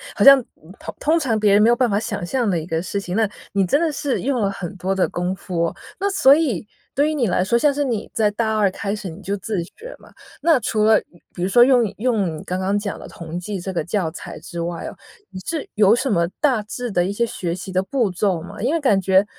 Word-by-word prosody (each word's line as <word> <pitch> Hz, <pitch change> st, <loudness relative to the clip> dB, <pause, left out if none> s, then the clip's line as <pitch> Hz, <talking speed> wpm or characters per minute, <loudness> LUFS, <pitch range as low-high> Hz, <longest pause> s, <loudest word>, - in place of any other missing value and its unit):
好 -, -, +1 dB
像 275 Hz, -1 st, +9 dB, 0.6 s
通 320 Hz, +3 st, +2 dB
常 240 Hz, -8 st, 0 dB
别 210 Hz, -1 st, +3 dB
人 205 Hz, +1 st, +5 dB
没 220 Hz, -, +5 dB
有 240 Hz, -, +5 dB
办 250 Hz, -2 st, +2 dB
法 200 Hz, +1 st, +1 dB
想 215 Hz, -5 st, -4 dB
象 235 Hz, +3 st, 0 dB
地 180 Hz, -, +1 dB
一 160 Hz, -, -4 dB
个 165 Hz, -1 st, -2 dB
事 200 Hz, +2 st, -3 dB
情。 180 Hz, +2 st, -4 dB
那 220 Hz, -2 st, +2 dB, 0.2 s
你 195 Hz, -1 st, +2 dB
真 285 Hz, -, +2 dB
的 330 Hz, -, +1 dB
是 285 Hz, -2 st, -2 dB
用 260 Hz, -1 st, 0 dB
了 200 Hz, -2 st, +1 dB
很 190 Hz, -3 st, -6 dB
多 190 Hz, +2 st, -1 dB
的 190 Hz, -, +2 dB
功 180 Hz, +2 st, -2 dB
夫。 170 Hz, -2 st, -2 dB, 0.3 s
那 400 Hz, +1 st, +1 dB
所 280 Hz, -8 st, +6 dB
以 265 Hz, -, 0 dB, 0.3 s
对 290 Hz, +3 st, +3 dB
于 -, -, -1 dB
你 255 Hz, -7 st, +1 dB
来 180 Hz, 0 st, +1 dB
说， 235 Hz, +5 st, +2 dB
像 290 Hz, +1 st, +3 dB
是 290 Hz, +1 st, 0 dB
你 235 Hz, -6 st, -2 dB
在 210 Hz, -2 st, +2 dB
大 220 Hz, 0 st, -1 dB
2 200 Hz, -3 st, +3 dB
开 200 Hz, +1 st, -3 dB
始 195 Hz, -3 st, -6 dB
你 160 Hz, -, -10 dB
就 200 Hz, +3 st, -2 dB
自 200 Hz, -1 st, -3 dB
学 455 Hz, -, -10 dB
嘛， -, -, -17 dB, 0.3 s
那 320 Hz, 0 st, +4 dB
除 215 Hz, 0 st, +1 dB
了 220 Hz, 0 st, +6 dB, 0.4 s
比 175 Hz, -, -3 dB
如 190 Hz, -, 0 dB
说 240 Hz, +5 st, +5 dB
用 250 Hz, -1 st, +6 dB
用 205 Hz, -9 st, 0 dB
你 -, -, -8 dB
刚 185 Hz, +1 st, -3 dB
刚 200 Hz, +2 st, +1 dB
讲 205 Hz, -1 st, -4 dB
的 -, -, -10 dB
同 170 Hz, 0 st, -7 dB
济 190 Hz, +2 st, -4 dB
这 190 Hz, +1 st, -5 dB
个 170 Hz, -, -1 dB
教 175 Hz, -1 st, -1 dB
材 -, -, -9 dB
之 170 Hz, -1 st, -7 dB
外 170 Hz, 0 st, -4 dB
哦， -, -, -7 dB, 0.4 s
你 185 Hz, -, -7 dB
是 320 Hz, -3 st, -4 dB
有 210 Hz, 0 st, +5 dB
什 260 Hz, +3 st, 0 dB
么 170 Hz, -5 st, +2 dB
大 260 Hz, -7 st, +2 dB
致 245 Hz, +3 st, -5 dB
的 175 Hz, -3 st, +1 dB
一 190 Hz, -, -1 dB
些 235 Hz, +4 st, 0 dB
学 175 Hz, -6 st, -4 dB
习 185 Hz, +1 st, -7 dB
的 185 Hz, +1 st, +2 dB
步 235 Hz, -1 st, 0 dB
骤 180 Hz, -2 st, 0 dB
吗？ 175 Hz, -, -9 dB
因 265 Hz, +7 st, +1 dB
为 335 Hz, -, +1 dB
感 210 Hz, -10 st, +3 dB
觉 190 Hz, +1 st, +4 dB
205 Hz, 280 characters per minute, -21 LUFS, 185-245 Hz, 0.6 s, 像